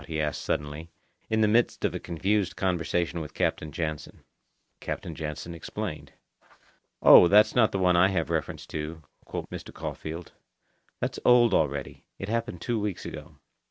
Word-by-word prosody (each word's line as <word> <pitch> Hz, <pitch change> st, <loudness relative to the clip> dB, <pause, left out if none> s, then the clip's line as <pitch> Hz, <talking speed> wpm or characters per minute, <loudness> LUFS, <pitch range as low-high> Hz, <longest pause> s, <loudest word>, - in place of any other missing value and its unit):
he 80 Hz, -1 st, -3 dB
asked 75 Hz, -1 st, -1 dB
suddenly, 75 Hz, +3 st, -3 dB, 0.4 s
in 110 Hz, 0 st, +2 dB
the 105 Hz, -, +5 dB
midst 115 Hz, +3 st, +2 dB
of -, -, 0 dB
a -, -, -3 dB
confused 95 Hz, +3 st, -1 dB
conversation 85 Hz, -2 st, -1 dB
with 75 Hz, -1 st, -8 dB
Captain 75 Hz, -, -1 dB
Jansen. 75 Hz, 0 st, -5 dB, 0.6 s
Captain 85 Hz, -, -5 dB
Jansen 80 Hz, +2 st, -5 dB
explained. 85 Hz, -, -6 dB, 0.9 s
"Oh, -, -, +10 dB
that's 105 Hz, +3 st, +6 dB
not 115 Hz, -3 st, +4 dB
the -, -, -1 dB
one 90 Hz, -1 st, +3 dB
I 90 Hz, +2 st, +6 dB
have 90 Hz, -6 st, -1 dB
reference -, -, -2 dB
to," 80 Hz, +1 st, -5 dB, 0.2 s
quoth -, -, -5 dB
Mr. -, -, -7 dB
Caulfeild. 80 Hz, +2 st, -6 dB, 0.7 s
"That's -, -, -2 dB
old 120 Hz, -3 st, +6 dB
already. 70 Hz, -4 st, -1 dB
It 95 Hz, -, -6 dB
happened 115 Hz, -6 st, -2 dB
two 120 Hz, -2 st, -1 dB
weeks 105 Hz, -3 st, -3 dB
ago." -, -, -8 dB
85 Hz, 160 wpm, -27 LUFS, 80-105 Hz, 0.9 s, Oh